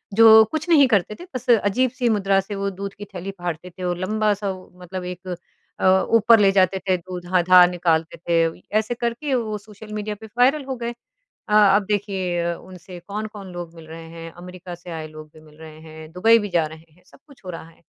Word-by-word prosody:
जो 220 0 +9
कुछ 315 +1 -3
नहीं 285 -5 +6
करते 210 -2 +1
थे 355 - -9
बस 255 +1 -6
अजीब-सी 240 +3 +2
मुद्रा 195 -2 +2
से 200 +2 -7
वो 200 0 -2
दूध 195 +1 -6
की 205 - -9
थैली 195 -1 -7
फाड़ते 175 0 -5
थे। 185 +1 -10
वो 180 - 0
लंबा-सा 205 +2 -1
वो 185 -1 -11
मतलब 180 +1 -6
एक 180 +1 -8 0.5
अ, 190 0 +4
ऊपर 225 +1 +5
ले 200 -1 +5
जाते 190 0 +3
थे 185 - +4
दूध 180 0 -8
हाँ 180 -1 +4
धार 180 0 +7
निकालते 165 -2 0
थे। 165 0 0 0.2
ऐसे 220 +2 -3
करके 235 +4 -2
वो 220 -3 -2
सोशल 210 +1 -12
मीडिया 210 0 -4
पे - - -9
वायरल 275 +4 +4
हो 265 -1 -4
गए। 235 0 -4 0.6
अ - - -1 0.2
अब 205 -1 +1
देखिए 190 -4 -1
अ, 170 0 -1
उनसे 180 -1 -12
कौन-कौन 205 -2 -6
लोग 175 -1 -7
मिल 160 -1 -13
रहे 165 +1 -9
हैं। 165 0 -9
अमेरिका 180 +1 -10
से 175 +1 -14
आए 160 -1 -5
लोग 155 0 -12
भी 155 - -16
मिल 155 -1 -19
रहे 155 -1 -12
हैं, 155 0 -12
दुबई 225 +6 +5
भी 205 -2 -4
जा 170 -3 +1
रहे 160 +1 -14
हैं 180 +3 -27
सब - - -20
कुछ 275 -6 -19
हो 185 - -7
रहा 165 -1 -9
है। 165 - -24
185 Hz, 225 wpm, -22 LUFS, 175-215 Hz, 0.6 s, जो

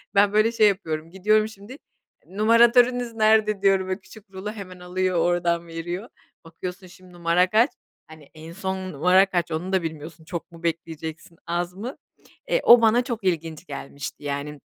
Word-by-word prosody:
Ben 200 +1 +4
böyle 215 +2 +4
şey 215 -2 +4
yapıyorum, 165 -5 -2
gidiyorum 215 +3 +2
şimdi, 220 +5 -12 0.5
"Numaratörünüz 235 +4 +4
nerede?" 215 -2 +3
diyorum, 195 -1 +3
böyle 190 +2 -3
küçük 205 +1 -16
rulo 195 +2 -6
hemen 185 -4 -10
alıyor 180 0 -1
oradan 170 0 +1
veriyor. 175 +7 -6 0.3
Bakıyorsun 180 +3 -8
şimdi 180 0 -17
numara 175 +1 +2
kaç? 230 +6 +4 0.4
Hani, 155 -3 -15
en 160 +1 -11
son 190 -1 -4
numara 180 +6 +4
kaç? 175 -3 -2
Onu 180 +5 -3
da 185 -3 +2
bilmiyorsun. 160 0 -7
Çok 170 0 -6
mu 165 0 -14
bekleyeceksin, 165 0 -5
az 175 +1 -2
mı? 230 +8 -7 0.5
Eee, - - +3
o 235 0 +8
bana 230 +2 +4
çok 235 -4 -5
ilginç 165 -2 -2
gelmişti 140 -1 -8
yani. 145 0 -4
185 Hz, 165 wpm, -24 LUFS, 165-215 Hz, 0.5 s, o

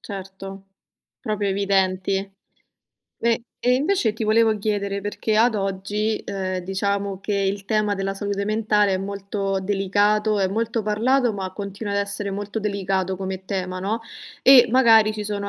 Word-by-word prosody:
Certo, 195 -1 -8 0.6
proprio 210 -4 -2
evidenti. 195 0 0 0.9
E 235 0 +1 0.2
e, 250 +1 +3
invece 280 - +1
ti 225 - -6
volevo 220 0 +3
chiedere 200 -1 -2
perché 210 +2 -2
ad 225 0 +4
oggi, 200 +2 -1
ehm, 190 -2 -3
diciamo 195 +1 -2
che 205 +1 -2
il 195 0 -1
tema 215 -1 +1
della 195 0 -2
salute 200 0 -2
mentale 210 -2 +2
è 185 - -1
molto 195 0 -3
delicato, 205 +2 +1
è 190 - +3
molto 225 +2 -1
parlato, 235 +4 +2
ma 190 -2 -5
continua 200 +1 -5
ad 200 - +1
essere 200 0 -2
molto 205 +2 -4
delicato 195 -2 -1
come 190 0 -5
tema, 185 -2 -3
no, 215 +4 -2 0.4
e 260 -2 +8
magari 225 -4 +5
ci 210 -1 -5
sono 200 -1 -3
200 Hz, 150 wpm, -23 LUFS, 195-215 Hz, 0.9 s, e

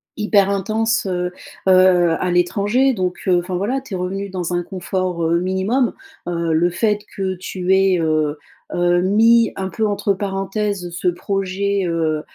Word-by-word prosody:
hyper 205 -2 +2
intense, 220 +3 0
heu 180 -1 -2 0.4
heu, 185 -2 +5
à 180 - -1
l'étranger, 205 +9 +2
donc 185 -4 -2
heu, 180 -1 +4
enfin, 180 +1 -4
voilà, 235 +9 -1
tu 220 -7 -7
es - - -2
revenu 195 +2 -3
dans 180 -2 -3
un 175 - +1
confort, 180 -1 -3
heu, 165 +1 +2
minimum, 190 +8 0 0.3
heu, 170 -2 -1
le 170 +2 +3
fait 210 +3 0 0.2
que 190 -1 -1
tu 185 0 -2
aies, 190 -1 +3
heu 155 -2 0 0.4
heu, 175 0 +2
mis 225 +4 +4
un 190 - -3
peu 220 +2 -1
entre 205 0 0
parenthèses 195 -1 -3
ce 175 +1 -3
projet, 195 +2 -1
heu 160 -2 0
185 Hz, 165 wpm, -19 LUFS, 175-200 Hz, 0.4 s, heu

